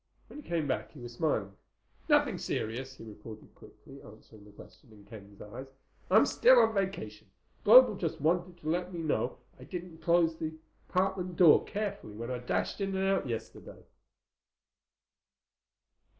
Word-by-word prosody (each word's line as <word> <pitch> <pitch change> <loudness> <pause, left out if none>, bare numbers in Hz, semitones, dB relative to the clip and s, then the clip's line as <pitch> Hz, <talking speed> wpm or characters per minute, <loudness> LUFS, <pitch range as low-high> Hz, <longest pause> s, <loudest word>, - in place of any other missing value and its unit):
When 295 - -11
he - - -18
came 165 -4 -1
back 110 -4 -3
he 145 - -13
was 120 -1 -9
smiling. 110 -9 -1 0.5
"Nothing - - +3
serious," 130 +4 -4
he - - -11
reported 110 0 -12
quickly, 140 +1 -16
answering 110 0 -16
the 105 - -16
question 115 +4 -17
in 105 -2 -17
Ken's 100 -2 -13
eyes. 120 +6 -9 0.4
"I'm 215 +4 +6
still 255 +2 +5
on 225 -2 +4
vacation. 190 - -4 0.3
Global - - +8
just 160 - -4
wanted 175 +3 0
to 155 - -4
let 180 +2 -2
me 175 - -6
know 155 - -1 0.2
I - - -11
didn't 175 -3 -8
close 170 -1 +2
the 160 0 -5 0.3
apartment 185 -1 -1
door 165 -3 +6
carefully 200 - -5
when 115 +3 -6
I 125 - -3
dashed 125 +10 -2
in 195 -1 -2
and 190 0 0
out 195 -7 0
yesterday." 115 -1 -7
155 Hz, 160 wpm, -30 LUFS, 110-185 Hz, 0.5 s, Global